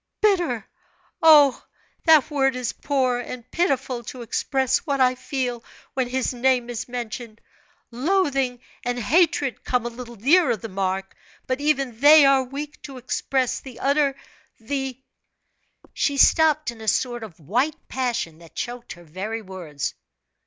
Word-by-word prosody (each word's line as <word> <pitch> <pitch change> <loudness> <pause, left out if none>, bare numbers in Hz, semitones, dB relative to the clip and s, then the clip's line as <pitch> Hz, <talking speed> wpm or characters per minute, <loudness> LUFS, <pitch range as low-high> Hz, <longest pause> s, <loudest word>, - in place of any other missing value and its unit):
"Bitter! 350 - +1 0.5
Oh, 295 -4 +6 0.4
that 315 -3 +5
word 270 -2 +2
is 250 -2 -3
poor 260 -4 0
and 245 0 -8
pitiful 265 -7 0
to 250 +1 -7
express 265 +3 0
what 280 -4 -2
I 255 -1 +4
feel 255 -2 -3 0.3
when 260 -2 -1
his 260 0 -1
name 245 -1 +1
is 235 - -5
mentioned. 235 -2 -6 0.5
Loathing 270 -3 0 0.2
and 245 -1 -2
hatred 285 - +1
come 250 -2 0
a - - -1
little 240 0 -9
nearer 275 - +3
the 225 - -8
mark, 190 0 -3 0.3
but 255 +2 -2
even 275 -6 0
they 295 +2 +8
are 275 -1 +5
weak 285 +3 -7
to 275 -2 -9
express 255 0 -1
the 260 -3 -11
utter 280 0 +2 0.4
the 265 +2 -4 0.4
" - - -49 0.3
She 285 -1 0
stopped 305 -2 +4
in 230 -1 -13
a 220 - -8
sort 240 +2 0
of 190 -7 -11
white 245 - 0
passion 240 -11 -2
that 165 -1 -17
choked 240 0 -5
her 175 - -15
very 200 +8 -5
words. 175 -7 -5
255 Hz, 150 wpm, -23 LUFS, 235-280 Hz, 0.5 s, they